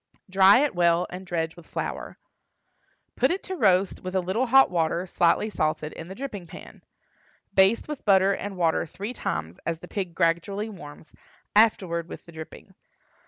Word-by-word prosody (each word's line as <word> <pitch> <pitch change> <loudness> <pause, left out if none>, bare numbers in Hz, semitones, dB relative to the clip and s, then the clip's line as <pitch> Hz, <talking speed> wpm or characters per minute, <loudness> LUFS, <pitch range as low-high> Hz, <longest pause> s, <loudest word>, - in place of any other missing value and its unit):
Dry 195 +5 +6
it 295 - +1
well, 175 0 +3
and 185 +1 -8
dredge 165 -2 -2
with 170 - -15
flour. - - -5 1.0
Put - - +2
it 370 +3 -2
to 375 - -5
roast 195 - +2
with 185 +1 -6
a - - +3
little 190 +8 -1
hot 270 -1 +6
water, 170 +1 0
slightly 175 +3 +2
salted, 155 -3 -2
in 165 - -9
the 190 - -8
dripping 210 -9 -6
pan. - - -12 0.7
Baste 195 +4 +3
with 300 -2 -6
butter 195 -1 +4
and 195 0 -5
water 165 -1 +1
three 205 +9 -6
times, 80 - -4
as 165 0 -2
the - - -12
pig 185 -5 -4
gradually 185 +7 0
warms, 155 -6 -12 0.4
afterward 180 -6 +3
with - - -9
the 170 - -13
dripping. 160 -1 -11
185 Hz, 170 wpm, -25 LUFS, 170-205 Hz, 1.0 s, Dry